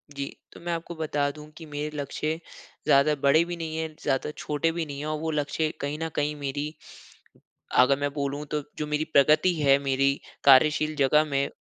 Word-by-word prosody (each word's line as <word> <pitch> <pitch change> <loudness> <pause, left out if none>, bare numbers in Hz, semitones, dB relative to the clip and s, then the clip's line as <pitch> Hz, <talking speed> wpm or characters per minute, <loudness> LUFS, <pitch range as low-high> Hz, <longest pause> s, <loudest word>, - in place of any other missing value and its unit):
जी, 140 - -3 0.3
तो - - -12
मैं 170 0 -3
आपको 170 +1 -5
बता 145 -2 -1
दूँ 150 +1 -12
कि 165 - -9
मेरे 150 0 -4
लक्ष्य 155 +3 -3 0.5
ज़्यादा 140 +2 +5
बड़े 155 +4 +5
भी 175 - -4
नहीं 160 -1 -4
हैं, 160 -1 -4
ज़्यादा 135 +1 0
छोटे 150 +2 -1
भी 170 -1 -3
नहीं 140 -2 -7
हैं 145 - -4
और 155 0 -2
वो 160 0 -2
लक्ष्य 150 +1 -1
कहीं 145 +1 -2
न 165 0 -2
कहीं 150 +1 0
मेरी, 145 +1 -4 1.1
अगर 135 +2 +5
मैं 145 0 -1
बोलूँ, 145 0 -2
तो 150 0 -2 0.2
जो 150 - -2
मेरी 150 +1 -1
प्रगति 155 +6 +5
है, 140 -1 +5
मेरी 140 0 +1 0.2
कार्यशील 150 +3 +5
जगह 150 +2 +4
में, 140 -2 0
150 Hz, 195 wpm, -26 LUFS, 140-155 Hz, 1.1 s, ज़्यादा